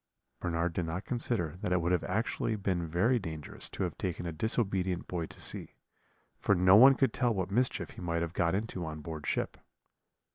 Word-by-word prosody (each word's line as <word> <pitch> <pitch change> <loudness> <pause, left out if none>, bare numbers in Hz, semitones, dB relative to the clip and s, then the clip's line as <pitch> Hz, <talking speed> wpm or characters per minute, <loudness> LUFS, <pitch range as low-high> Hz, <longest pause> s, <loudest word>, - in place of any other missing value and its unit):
"Bernard 85 0 -1
did 85 -1 -1
not 85 +5 -4
consider 115 - -1
that - - -2
it 90 - +3
would 85 +2 +1
actually 110 +3 -1
have 105 -3 -5
been 85 -4 0
very 105 +10 +2
dangerous 80 -6 -6
to - - -3
have - - -2
taken 90 -1 -3
a 85 - -2
disobedient 95 -1 -1
boy 85 -3 -3
to - - -14
sea, - - -6 0.6
for 100 - +3
no 90 +1 +6
one 130 +5 +9
could 135 - +2
tell 120 -4 +1
what 95 -1 -2
mischief 125 +4 0
he - - -10
might 85 -1 -1
have 85 0 -4
got 85 -1 +1
into 100 -3 -3
on 80 -1 -5
board 80 -1 -6
ship. - - -1
90 Hz, 205 wpm, -31 LUFS, 85-105 Hz, 0.6 s, one